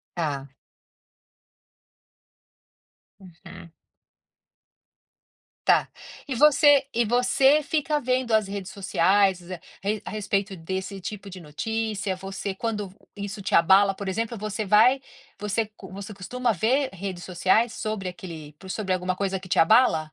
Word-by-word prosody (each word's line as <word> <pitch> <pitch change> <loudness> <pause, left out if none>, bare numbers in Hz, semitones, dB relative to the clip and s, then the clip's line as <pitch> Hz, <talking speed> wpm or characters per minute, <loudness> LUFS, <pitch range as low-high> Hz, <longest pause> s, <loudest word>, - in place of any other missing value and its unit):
Tá. 145 -5 -2 2.7
Uhum. 170 -2 -13 2.0
Tá. - - +4 0.4
E 270 - -2
você 290 +1 +5
e 235 0 +1
você 260 +5 +4
fica 300 0 0
vendo 255 -2 -1
as 215 -2 +3
redes 195 0 -6
sociais 190 0 +2 0.4
re 205 +1 -1
a - - -6
respeito 200 -1 -2
desse, 190 +3 -5
tipo, 195 +2 -7
de 185 0 -9
notícia? 205 +5 -3
Você 195 +1 -5
quando 210 -1 -3
v 190 - -21 0.2
isso 200 0 -6
te 195 - -3
abala, 195 +4 +5
por 200 +1 -7
exemplo, 225 +4 -2
você 215 0 -4
vai 230 +7 +5 0.4
você 210 +2 -1
co 190 -3 -12
você 200 +3 -8
costuma 240 +5 -2
ver 255 - +1
redes 190 -1 -6
sociais 190 +6 +2
sobre 215 -6 -4
aquele 165 -5 -9
p 190 - -12
sobre 190 0 -2
alguma 185 0 -1
coisa 195 -1 -2
que 185 - -12
te - - 0
abala? 165 -4 +4
200 Hz, 135 wpm, -25 LUFS, 185-225 Hz, 2.7 s, você